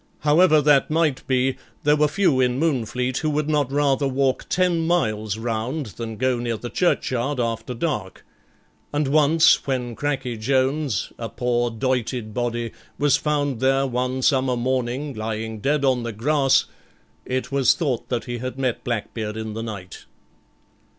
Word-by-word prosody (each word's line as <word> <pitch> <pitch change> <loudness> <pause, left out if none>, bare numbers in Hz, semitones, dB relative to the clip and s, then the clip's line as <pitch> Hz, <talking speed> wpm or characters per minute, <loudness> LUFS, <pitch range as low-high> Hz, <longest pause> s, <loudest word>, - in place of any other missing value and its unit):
However 155 0 +5
that 145 -2 +4
might 155 -3 0
be, 130 0 +1 0.3
there 150 +1 +4
were 150 0 +3
few 150 -4 +2
in 125 -1 +2
Moonfleet 125 -4 0
who 155 - -1
would 150 0 -1
not 145 -4 +1
rather 140 -1 +2
walk 135 0 0
ten 175 -3 +1
miles 110 - 0
round 120 +6 -2
than 115 -2 -5
go 130 0 +1
near 120 -1 -2
the 120 +2 -7
churchyard 135 -6 0
after 115 +1 -2
dark; 110 - -3 0.7
and 145 -1 0
once 155 +3 +4
when 125 -3 -1
Cracky 135 -4 -2
Jones, 130 - 0
a - - -4
poor 120 -1 0
doited 120 -1 -2
body, 120 -1 -2 0.3
was 145 -2 +3
found 145 -4 -1
there 135 +1 +2
one 130 0 -2
summer 130 -3 +2
morning, 130 +3 -1
lying 110 0 -4
dead 140 +5 +1
on 130 -2 +2
the 115 0 -4
grass, 135 +5 +2 0.6
it 130 +1 -3
was 135 -3 +4
thought 140 -9 -2
that 120 -4 -2
he 120 -1 -4
had 130 +2 -5
met 130 -3 -1
Blackbeard 110 -2 -3
in 110 -1 -5
the 110 - -4
night. 100 -5 -8
130 Hz, 155 wpm, -23 LUFS, 120-145 Hz, 0.7 s, However